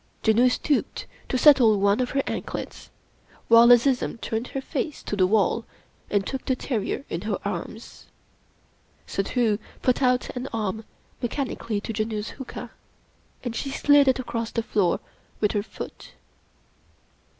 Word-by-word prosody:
Janoo 235 +3 +5
stooped 285 +3 -1 0.2
to 255 - +1
settle 250 -7 +6
one 200 +2 +3
of 250 -1 0
her 275 0 0
anklets, - - -5 0.6
while 230 +1 +8
Azizun 245 0 +3
turned 225 +3 -3
her 270 - -4
face 285 +2 -4
to - - -3
the 185 -2 +3
wall 215 +2 +2 0.5
and 200 -1 +1
took 265 - -4
the 260 - 0
terrier 245 +1 -3
in - - -4
her - - -2
arms. - - -6 1.0
Suddhoo 215 +1 0 0.2
put 255 +1 +2
out 250 0 +1
an 250 +2 -4
arm 220 -1 -3 0.4
mechanically 240 -4 -2
to 225 - -5
Janoo's 215 0 -3
huqa, 265 - -7 0.7
and 240 -2 -4
she 275 - -3
sUd 285 +1 +4
it 260 - +4
across 230 -3 -3
the 230 - -2
floor 200 -5 +1 0.4
with 210 - +2
her 205 - 0
foot. 205 - -9
235 Hz, 145 wpm, -25 LUFS, 215-260 Hz, 1.0 s, while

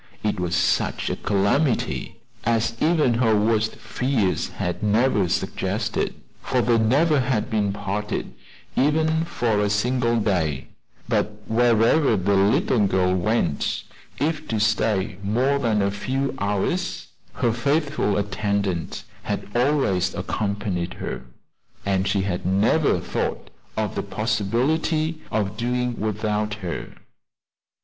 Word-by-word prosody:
It 105 -2 0
was 90 0 -1
such 90 0 +1
a - - -1
calamity 105 +8 0 0.2
as 115 0 +1
even 155 -6 +3
her 115 -2 +3
worst 110 +1 +1
fears 125 -8 -1
had 90 +3 -4
never 105 -2 +2
suggested, - - -1 0.3
for - - 0
they 120 -1 +3
never 140 +7 +3
had 125 -2 0
been 105 -2 +1
parted, 100 +1 -3 0.4
even 160 +3 +2
for 115 -10 0
a 105 0 +2
single 120 +3 +1
day; 85 -10 0 0.4
but 105 0 -1
wherever 115 +3 +3
the 95 +2 +1
little 110 - +3
girl 90 -1 +2
went, 95 -5 0 0.3
if 155 +1 -1
to 110 - -1
stay 105 -3 +1
more 125 +8 +1
than 110 -5 +1
a 100 - +1
few 130 +7 -2
hours, 105 - -1 0.2
her 120 -3 +1
faithful 140 -2 +1
attendant 100 -3 -1 0.2
had - - -4
always 120 -9 +2
accompanied 100 -2 -2
her, - - -5 0.6
and 95 -1 +1
she 100 - +1
had 90 -2 -2
never 105 - +2
thought - - -3 0.3
of - - -1
the - - -2
possibility 145 +9 0
of 105 -1 -1
doing 125 +1 -1
without 105 0 -1
her. 90 -6 -6
110 Hz, 125 wpm, -23 LUFS, 100-125 Hz, 0.6 s, even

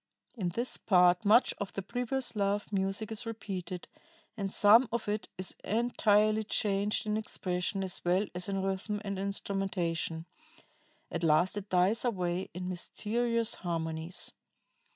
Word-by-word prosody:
"In 190 -7 -1
this 235 +8 +2
part 180 -2 +4
much 225 +5 +5
of 205 - -4
the 195 - -4
previous 245 +4 -2
love 205 0 0
music 195 +3 -1
is 220 +1 -3
repeated, 190 -5 -5 0.5
and 195 -3 -3
some 225 +5 +6
of 235 -2 -2
it 210 +1 -2
is 185 0 -5
entirely 215 -1 +2
changed 205 0 0
in 210 0 0
expression 195 -2 -2
as 185 -1 -4
well 180 +4 +2
as 180 +2 -3
in 195 -1 -1
rhythm 195 +2 -2
and 200 -1 -3
instrumentation. 190 -5 -2 0.9
At - - -2
last 165 +4 +3
it 205 -1 -5
dies 185 +5 +3
away 185 -6 -1
in 180 +1 -5
mysterious 230 +5 -1
harmonies. 165 0 -4
195 Hz, 140 wpm, -31 LUFS, 180-215 Hz, 0.9 s, some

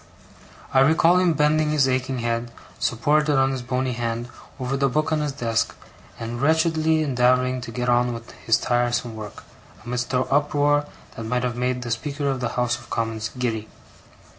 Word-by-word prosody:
I 130 - +5
recall 160 +5 +5
him 180 -2 +3
bending 150 +1 +2
his 150 -3 +3
aching 130 0 -1
head, 115 0 -1 0.3
supported 150 +5 +2
on 135 0 +3
his 130 -1 -3
bony 125 +1 -1
hand, 120 0 -3 0.3
over 130 +1 -2
the 140 0 +2
book 155 +4 0
on 155 - +2
his 150 -1 -1
desk, 115 -4 -1 0.4
and 115 +1 -5
wretchedly 160 +1 +2
endeavouring 130 -1 +2
to 120 - -7
get 125 +1 -3
on 120 0 +3
with 115 0 -8
his 115 - +1
tiresome 120 -1 0
work, 105 -2 -8 0.4
amidst 125 +1 -3
an 125 - +2
uproar 145 0 +2 0.3
that 115 - -6
might 125 +2 0
have 125 -2 -1
made 125 0 -1
the 120 - -5
Speaker 145 +4 -2
of 130 - -3
the 120 -1 -1
House 120 -1 +1
of 120 - -16
Commons 115 -1 -2
giddy. 110 -3 -2
125 Hz, 180 wpm, -23 LUFS, 120-145 Hz, 0.4 s, I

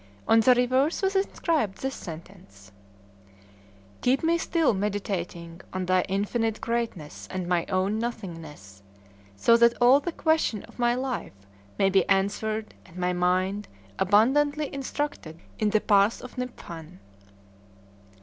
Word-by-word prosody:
On 225 - +6
the 250 +3 +5
reverse 260 +8 +1
was 385 +1 +1
inscribed 330 - 0
this 265 0 -1
sentence: 155 - -11 1.3
"Keep 260 +4 +2
me 335 +1 +2
still 325 -6 +1
meditating 190 -4 -4
on 185 0 -2
Thy 185 0 +3
infinite 215 +3 -1
greatness 230 -10 -4
and 185 -1 -4
my 175 -1 0
own 195 +3 0
nothingness, 165 - -7 0.5
so 230 - +4
that 235 0 +4
all 250 +3 +6
the 345 - -4
questions 315 - 0
of - - -18
my 240 0 +2
life 250 - -5 0.3
may 195 0 +3
be 190 -2 +2
answered 210 +3 0
and 170 - -16
my 180 0 0
mind 185 +3 0 0.3
abundantly 285 +9 +2
instructed 275 - -4 0.2
in 215 - +2
the 215 +1 +3
path 205 +1 +3
of 250 - -10
Niphan!" 180 - -7
210 Hz, 130 wpm, -26 LUFS, 180-250 Hz, 1.3 s, On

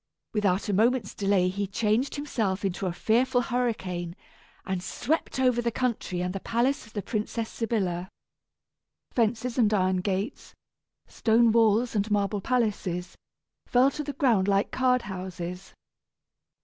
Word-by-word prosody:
Without 200 -2 +1
a 205 - 0
moment's 225 +1 +2
delay 195 -2 +2
he 200 +2 -2
changed 220 +6 0
himself 220 -10 -2
into 190 0 -2
a - - 0
fearful 235 +8 +2
hurricane, 190 -9 -2 0.5
and 190 -1 -2
swept 275 - -2
over 250 -2 +3
the 235 - 0
country 230 -7 -2
and 180 0 -2
the 195 - -3
palace 240 +5 0
of 215 - -18
the 205 - -3
Princess 220 0 -2
Sybilla. 190 -6 -2 1.0
Fences 235 +1 0
and 220 -3 +4
iron 185 -2 +2
gates, 195 +6 -3 0.5
stone 230 0 +3
walls 225 +1 +3
and 205 +1 0
marble 205 0 0
palaces 195 -7 -1 0.5
fell 255 +3 +4
to 300 - -4
the 285 0 -5
ground 235 - +2
like 200 0 +2
card 255 -1 +2
houses. 180 -1 -6
215 Hz, 140 wpm, -27 LUFS, 190-240 Hz, 1.0 s, and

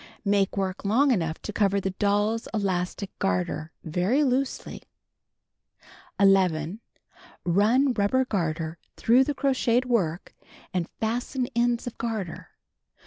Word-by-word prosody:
Make 200 -1 +1
work 190 -1 -2
long 250 +8 +3
enough 165 -8 0
to 210 - -5
cover 200 -1 +2
the 195 0 -2
doll's 205 +3 0
elastic 190 -1 -2
garter 95 - -1
very 185 - +1
loosely. 265 0 -1 1.4
11. 190 -2 +3 0.7
Run 225 +10 +3
rubber 235 +5 +2
garter 165 -6 -2 0.2
through 245 +3 +5
the 290 - -2
crocheted 255 -2 +1
work 190 -9 -1 0.4
and 175 -2 -1
fasten 245 +3 -1
ends 235 0 +1
of 245 - -7
garter. 220 -7 -4
205 Hz, 115 wpm, -26 LUFS, 180-245 Hz, 1.4 s, through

